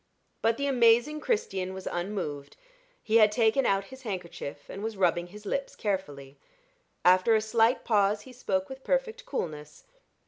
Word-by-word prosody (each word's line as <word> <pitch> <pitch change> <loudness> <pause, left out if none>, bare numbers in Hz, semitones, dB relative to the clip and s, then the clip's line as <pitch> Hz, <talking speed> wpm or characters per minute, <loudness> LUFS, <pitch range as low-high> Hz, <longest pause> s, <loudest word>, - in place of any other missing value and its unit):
But 225 0 +2
the 280 - -1
amazing 245 +2 +4
Christian 190 - -2
was 190 - -8
unmoved. 175 -6 -4 0.5
He 220 +1 +3
had 215 -2 +6
taken 230 +4 +2
out 195 0 +2
his 265 - -11
handkerchief 175 - -6
and 195 - -7
was 220 -2 -4
rubbing 175 -2 +1
his 210 +3 -13
lips 275 +6 -3
carefully. 145 -9 -4 0.7
After 185 +5 +5
a - - +4
slight 225 +2 +2
pause, 205 -2 +2
he 260 - -13
spoke 190 -6 -1
with 265 0 -10
perfect - - -1
coolness. 150 - -5
210 Hz, 160 wpm, -28 LUFS, 185-245 Hz, 0.7 s, had